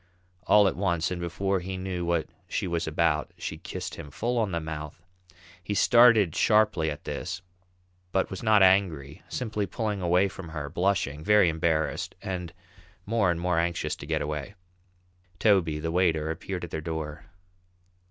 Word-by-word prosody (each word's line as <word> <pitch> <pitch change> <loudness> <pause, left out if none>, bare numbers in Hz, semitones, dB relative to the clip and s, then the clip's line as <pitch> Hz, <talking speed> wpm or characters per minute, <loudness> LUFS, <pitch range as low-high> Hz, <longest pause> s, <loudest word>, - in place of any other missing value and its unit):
All 105 -1 +6
at - - 0
once, 85 -4 0
and 90 -1 -3
before 95 +3 -1
he 95 +1 -5
knew 95 -1 -3
what 85 -2 0 0.2
she - - -2
was 85 -2 -2
about, 80 -1 +1
she - - -5
kissed - - -6
him 80 -3 -8
full 120 - -1
on 105 -4 0
the 85 - -1
mouth. 80 -1 -6 0.6
He 105 - -3
started 115 -7 +5
sharply 105 -7 +3
at 75 - -6
this, 90 +2 -5 0.7
but 95 +1 0
was 95 - -5
not 110 -3 +5
angry, 85 -7 +2
simply 110 -5 -2
pulling 105 -3 -3
away 90 +2 +3
from 95 -3 -9
her, 75 -3 -5
blushing, 85 -5 0
very 105 -2 +5
embarrassed, 80 -1 -1
and 90 -3 -5 0.5
more 105 -3 +2
and 85 -1 0
more 90 -1 +1
anxious 85 0 -1
to 70 - -9
get 80 -1 0
away. 75 +5 -5 0.8
Toby, 90 -7 +3
the 80 +2 -3
waiter, 80 -3 +1
appeared 90 +2 -5
at 85 - -6
their 80 - -3
door. 80 -1 -5
85 Hz, 165 wpm, -27 LUFS, 80-100 Hz, 0.8 s, All